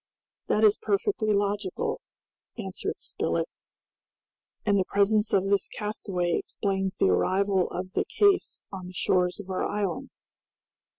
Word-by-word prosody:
"That 215 - +2
is 215 0 +5
perfectly 215 - +1
logical," 200 -2 -1 0.6
answered - - -4
Spilett; - - -2 1.2
"and 200 -1 +3
the 185 - +1
presence 210 +2 +2
of 195 -1 +3
this 200 0 +2
castaway 195 -4 -2
explains 195 -1 -2
the - - +3
arrival 185 - +2
of 185 +1 -5
the - - 0
case 405 -2 +2
on 185 -2 -6
the 180 - -10
shores 180 +1 +1
of 195 -2 -7
our 185 - -1
island. 200 -5 -2
200 Hz, 130 wpm, -27 LUFS, 185-210 Hz, 1.2 s, is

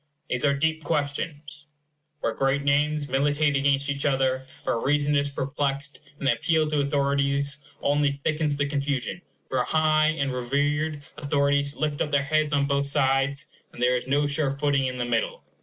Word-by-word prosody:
These 125 +3 +1
are 140 - +2
deep 160 +2 0
questions, 145 +1 -3 0.5
where - - 0
great 135 +1 0
names 145 +1 +1
militate 145 +2 +1
against 140 0 +2
each 140 0 -2
other, 130 -1 +1 0.2
where 115 - 0
reason 145 +3 +1
is 145 0 +1
perplexed, 140 +1 -3 0.2
and 140 - -3
an 125 - +5
appeal 155 +5 +1
to 150 -1 0
authorities 140 0 +1 0.2
only 145 0 +2
thickens 150 +1 -1
the 145 - +1
confusion; 140 +2 -2 0.3
for 130 -1 0
high 155 +1 +3
and 140 -4 -1
reverend 145 +4 -1 0.2
authorities 140 0 +1
lift 150 -2 -2
up 150 - 0
their 145 -1 +2
heads 155 +1 +1
on 140 -1 +2
both 140 0 0
sides, 140 0 +1 0.2
and - - -12
there 125 +1 +3
is 125 - -3
no 145 +2 +2
sure 145 0 0
footing 140 -1 +1
in 125 0 -4
the 120 - -1
middle. 120 -1 -1
140 Hz, 175 wpm, -25 LUFS, 140-150 Hz, 0.5 s, an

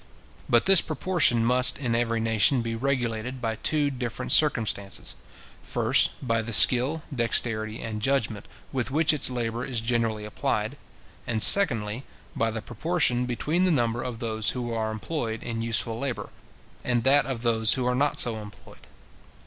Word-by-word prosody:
But 120 -1 +3
this 190 -3 +6
proportion 155 -7 +1
must 125 +1 +3
in 125 -4 -3
every 115 -1 -1
nation 115 +3 +1
be 115 0 -4
regulated 125 -1 -3
by 115 -2 -4
two 145 +1 0
different 125 -1 -5
circumstances: 110 -9 +1 0.5
first, - - +2 0.2
by 115 -1 0
the 115 +1 -6
skill, 130 +8 +5
dexterity, 115 -2 0
and 110 -1 -6
judgment 115 -5 -2 0.2
with 130 -2 -2
which 155 +3 +2
its 150 - +1
labour 120 -1 -4
is 125 -3 -4
generally 115 -2 -2
applied; 105 - -3 0.5
and, 110 -2 +2
secondly, 115 - +5 0.3
by 115 - -1
the 110 -1 -6
proportion 125 -1 0
between 150 +8 -2
the - - +1
number 120 -6 -1
of 125 -2 -6
those 110 -3 -3
who 120 -2 -5
are 110 -1 -3
employed 115 0 -5
in 115 -1 -5
useful 115 0 -1
labour, 135 -2 -5 0.5
and 120 -2 -1
that 135 0 +3
of 125 -3 -6
those 110 -2 +3
who 130 -2 -3
are 125 - 0
not 145 +4 -1
so 115 -2 +1
employed. 105 -2 -14
120 Hz, 160 wpm, -24 LUFS, 115-130 Hz, 0.5 s, this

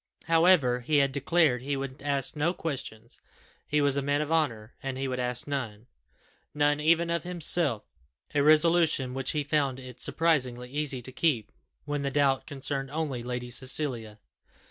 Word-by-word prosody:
However, 165 -7 +4
he 145 +5 0
had 140 -1 +3
declared 140 -1 +2
he 140 +1 -2
would 135 -1 -6
ask 140 0 0
no 160 +4 0
questions; 125 -8 -6 0.5
he 150 0 +1
was 140 -1 +2
a 140 - 0
man 145 +1 0
of 150 +1 -3
honour, 125 -9 -1
and 135 -1 -4
he 135 0 -2
would 130 -1 -3
ask 125 -1 -2
none 120 -7 -4 0.7
none 145 0 +2
even 170 +2 +2
of 170 -1 0
himself 165 -8 +3 0.5
a 145 - +2
resolution 155 -3 +3
which 135 0 -2
he 150 -1 0
found 140 -3 0
it 125 -1 -11
surprisingly 125 -7 0
easy 140 -3 -2
to 130 - -4
keep 130 -6 0 0.3
when 145 -1 -2
the 140 - -1
doubt 135 -1 +1
concerned 135 -1 -3
only 145 -4 -3
Lady 125 0 -5
Cecilia. 125 -4 -2
140 Hz, 165 wpm, -28 LUFS, 125-155 Hz, 0.7 s, However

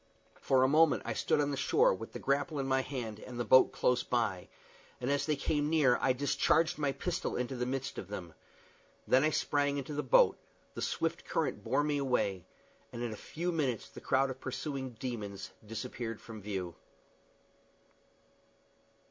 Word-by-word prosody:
For 130 -1 +3
a - - +5
moment 155 +2 +4
I - - -1
stood - - +1
on 145 0 +1
the - - -1
shore, 470 - +4
with - - -7
the - - -6
grapple 145 +3 0
in 135 - -1
my 130 0 +2
hand 120 -6 -5
and 120 +1 -8
the 120 - -1
boat 130 - +6
close 125 0 +2
by, 110 -7 -1 0.5
and 125 +2 -1
as 140 +2 0
they 155 - +2
came 145 +1 0
near 145 -6 +4
I - - +3
discharged 155 +5 +2
my 145 -2 +1
pistol 180 +5 -3
into 125 +2 -2
the 125 0 -2
midst 135 +1 -3
of - - -7
them. 90 -5 -7 0.7
Then 130 +2 +5
I 155 - +4
sprang 145 -2 +1
into 140 +2 -4
the 145 - -1
boat; - - +4 0.3
the - - -6
swift - - -1
current - - -2
bore 145 - +1
me 145 -1 0
away, 100 -9 0 0.5
and 120 - -5
in 115 -2 -3
a - - -6
few 170 +10 -4
minutes 135 -9 -1
the - - -11
crowd 135 0 +2
of 130 - -9
pursuing 130 -1 -4
demons 105 -6 -5 0.2
disappeared 115 0 -5
from 110 -2 -10
view. 95 -4 -4
130 Hz, 180 wpm, -32 LUFS, 120-145 Hz, 0.7 s, boat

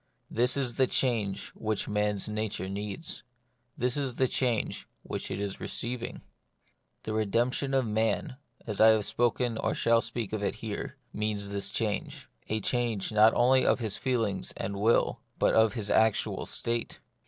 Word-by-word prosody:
This 125 +4 +3
is 125 -4 -1
the 130 - +4
change 110 -8 0
which 110 -2 -2
man's 105 -1 0
nature 105 -3 -2
needs: 105 - -4 0.6
this 125 +1 +1
is 135 -4 -2
the 130 - +2
change 120 -3 -1 0.2
which - - -5
it - - -3
is 100 -1 -3
receiving. 120 0 -4 0.8
The 110 - -3
redemption 120 +6 +1
of 130 -2 +2
man, 110 +3 0 0.3
as 105 -2 -1
I 110 - +9
have 110 -2 +5
spoken 120 +1 0
or - - 0
shall 115 0 +3
speak 115 -4 -3
of 110 - -1
it 100 - -1
here, 110 -1 -5 0.2
means 105 -1 -1
this 100 0 -1
change; 105 -3 -3 0.2
a 110 - 0
change 115 -3 0
not 110 +1 +6
only 130 +2 +5
of - - +3
his 110 -5 -2
feelings 115 -7 -1
and 100 +1 -3
will, 110 +3 +3 0.2
but - - +3
of 110 -1 +4
his 105 -3 -1
actual 110 -1 +2
state. 115 0 -2
110 Hz, 165 wpm, -29 LUFS, 105-120 Hz, 0.8 s, I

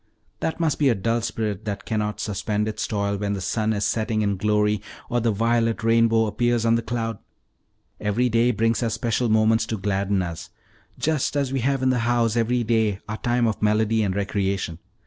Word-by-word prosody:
That 160 - -2
must 160 -3 0
be 145 -3 +4
a 120 - +3
dull 115 +4 0
spirit 110 -2 -3
that 100 -2 -4
cannot 105 -1 -2
suspend 105 +1 -2
its 110 0 -3
toil 100 -1 -1
when 100 0 -2
the 100 - -3
sun 110 +4 -1
is 100 -1 0
setting 110 +1 0
in 100 -1 +1
glory, 105 +1 +1 0.3
or 120 - +2
the 115 - +1
violet 115 +2 +1
rainbow 115 0 +4
appears 120 +1 0
on 115 - +4
the 115 - +2
cloud. 115 -2 -3 0.8
Every 105 +4 +1
day 115 +1 +3
brings 115 0 +1
us 115 -3 0
special 120 +1 0
moments 110 +1 +3
to 110 - -2
gladden 100 -1 0
us, 85 -2 -6 0.5
just 155 -2 0
as 140 -2 0
we 135 - +1
have 135 +1 0
in 130 - +3
the 125 - +1
house 115 -1 +1
every 120 +1 +1
day 110 -3 +1
our 105 +1 -4
time 120 0 +1
of 110 -2 -1
melody 110 +1 +2
and 95 -3 0
recreation. 100 -4 -2
110 Hz, 200 wpm, -24 LUFS, 105-115 Hz, 0.8 s, be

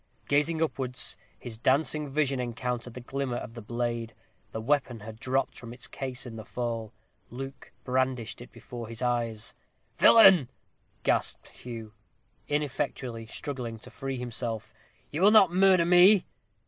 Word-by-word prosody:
Gazing 160 +3 +2
upwards, 130 -5 -2 0.2
his 115 -3 -8
dancing 145 +3 +1
vision 140 -2 0
encountered 125 0 -3
the 125 - -7
glimmer 135 0 -3
of 115 - -7
the 115 - -8
blade. 120 0 -3 0.4
The 110 - -4
weapon 125 -2 0
had 110 +1 -9
dropped 130 +2 0
from 115 -1 -9
its 125 - -7
case 130 -1 -5
in 115 -2 -8
the 110 - -7
fall. 115 -2 -4 0.4
Luke 135 +2 -8
brandished 130 -3 -1
it 120 - -11
before 120 -2 -8
his 115 +2 -6
eyes. 115 -3 -1 0.5
"Villain!" 190 - +8 0.5
gasped - - 0
Hugh, 115 -3 -9 0.5
ineffectually 130 -5 -2
struggling 125 -3 -4
to 125 +3 -10
free 135 +2 -4
himself, 120 -2 -4 0.4
"you 155 - -3
will 200 - +8
not 205 -5 +6
murder 185 -2 +5
me?" 180 +3 +7
125 Hz, 145 wpm, -28 LUFS, 115-140 Hz, 0.5 s, Villain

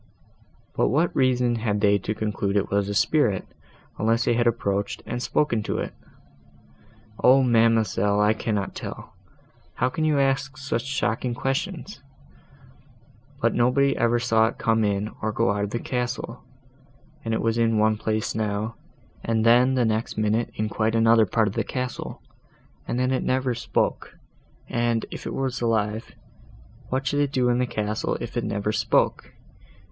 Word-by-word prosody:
"But - - +1
what 160 +5 +1
reason 125 -2 +2
had 105 -2 -1
they 100 0 +3
to 105 +3 -3
conclude 105 -2 -1
it 100 - -1
was 100 0 +1
a 100 - -2
spirit, 115 -6 +2 0.5
unless 115 +2 +2
they - - +3
had 120 0 +2
approached, 100 -3 -1
and 120 +1 -4
spoken 120 -4 +1
to - - -3
it?" - - -4 1.3
"O 130 +2 +6
ma'amselle, 115 -4 +3
I 105 +1 +4
cannot 105 -3 -2
tell. - - -8 0.6
How 125 - +1
can 155 +4 -3
you 155 -2 +2
ask 135 -1 0
such 130 -4 -3
shocking 120 -3 -1
questions? 145 +7 -3 1.4
But 115 - +2
nobody 135 +3 +3
ever 120 0 +2
saw 115 -1 +3
it - - -5
come 115 -1 +1
in, 100 +1 -1
or 110 - -1
go 100 - +1
out 100 0 -1
of - - -6
the 120 - -2
castle; 125 -1 -4 0.8
and 115 - -3
it 110 - 0
was 115 +1 +1
in 115 -1 +2
one 110 0 +3
place 110 0 -2
now, 110 0 -2 0.5
and 110 -1 0
then 125 +3 +5
the 125 -2 +2
next 110 0 -1
minute 110 +2 +1
in 110 - -1
quite 110 +1 0
another 115 -1 +5
part 110 +3 +2
of 100 - -3
the - - -1
castle; 125 -1 -5 0.6
and - - -2
then 130 +1 +1
it 130 - 0
never 130 -1 0
spoke, 120 - -2 0.5
and, 120 -1 0
if - - -7
it - - -4
was 130 -2 -2
alive, 110 -1 -1 0.7
what 130 +1 -1
should 145 +2 0
it 145 -1 +1
do 125 -3 +2
in 120 0 +2
the 125 - +1
castle 105 -1 -2
if - - -7
it - - -1
never 100 +1 -1
spoke? - - 0
115 Hz, 170 wpm, -24 LUFS, 110-125 Hz, 1.4 s, O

